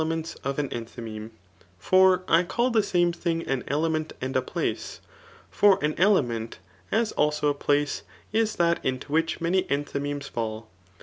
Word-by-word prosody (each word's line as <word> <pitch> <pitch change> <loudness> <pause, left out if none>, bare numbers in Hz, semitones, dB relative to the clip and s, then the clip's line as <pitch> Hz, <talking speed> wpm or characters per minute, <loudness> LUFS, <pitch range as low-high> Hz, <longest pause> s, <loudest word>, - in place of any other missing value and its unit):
ments 165 +1 -3
of 140 +1 -2
an 145 -1 0
enthymeme; 115 -2 -7 0.5
for 185 - +4
I 165 - +5
call 240 +8 0
the 225 -2 +4
same 175 -3 +1
thing 165 -1 -2
an 135 -2 -1
element 155 +2 -1
and 130 +1 -3
place. - - -3 0.5
For 205 -2 +5
an 150 0 +1
element, 120 - +2 0.3
as 225 0 +1
also 150 0 +1
a - - +2
places 145 0 0 0.3
b 225 - +3 0.2
that 170 -1 +2
into 130 +2 -3
which 165 +2 +1
many 175 +3 +2
enthymfemes 145 0 -3
£dl. 110 -1 -3
150 Hz, 150 wpm, -26 LUFS, 135-175 Hz, 0.5 s, I